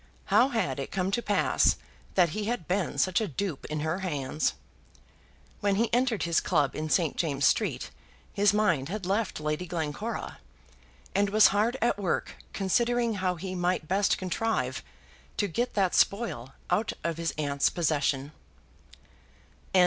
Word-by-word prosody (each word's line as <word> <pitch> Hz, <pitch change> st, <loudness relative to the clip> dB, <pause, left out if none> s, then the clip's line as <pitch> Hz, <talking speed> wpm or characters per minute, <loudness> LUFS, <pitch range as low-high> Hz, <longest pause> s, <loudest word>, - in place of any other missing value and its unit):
How 255 Hz, -, +6 dB
had 190 Hz, -, -1 dB
it 135 Hz, -, -4 dB
come 190 Hz, 0 st, -1 dB
to 235 Hz, -, 0 dB
pass 205 Hz, -3 st, +2 dB, 0.4 s
that 180 Hz, -3 st, +5 dB
he 210 Hz, +6 st, -3 dB
had 220 Hz, -7 st, -3 dB
been 180 Hz, -6 st, -1 dB
such 185 Hz, +8 st, +2 dB
a 215 Hz, -, -1 dB
dupe 175 Hz, -1 st, -4 dB
in 155 Hz, 0 st, -3 dB
her 160 Hz, +4 st, -1 dB
hands? 150 Hz, -5 st, -1 dB, 1.0 s
When 200 Hz, -1 st, +1 dB
he 230 Hz, +3 st, 0 dB
entered 245 Hz, -3 st, +2 dB
his 170 Hz, -1 st, +2 dB
club 150 Hz, -6 st, +1 dB
in 155 Hz, 0 st, -3 dB
St. 165 Hz, 0 st, +2 dB
James's 140 Hz, -5 st, +2 dB
Street -, -, 0 dB, 0.4 s
his 205 Hz, -1 st, +4 dB
mind 175 Hz, -10 st, +1 dB
had 200 Hz, 0 st, -4 dB
left 200 Hz, -1 st, -1 dB
Lady 150 Hz, +4 st, -2 dB
Glencora, 160 Hz, -4 st, -4 dB, 0.7 s
and 200 Hz, +1 st, +2 dB
was 215 Hz, +1 st, +6 dB
hard 220 Hz, +6 st, +1 dB
at 235 Hz, -, +1 dB
work 190 Hz, -4 st, -1 dB, 0.2 s
considering 235 Hz, +4 st, +1 dB
how 180 Hz, -1 st, +1 dB
he 185 Hz, +2 st, -5 dB
might 175 Hz, -3 st, -1 dB
best 195 Hz, +3 st, +2 dB
contrive 185 Hz, -, -1 dB, 0.6 s
to 205 Hz, -, +1 dB
get 235 Hz, +8 st, -2 dB
that 190 Hz, -3 st, +2 dB
spoil 135 Hz, -, +1 dB, 0.2 s
out 215 Hz, +1 st, +1 dB
of 170 Hz, -1 st, -1 dB
his 165 Hz, -1 st, -1 dB
aunt's 140 Hz, -2 st, +1 dB
possession. 145 Hz, -4 st, 0 dB
185 Hz, 155 wpm, -28 LUFS, 155-205 Hz, 1.0 s, How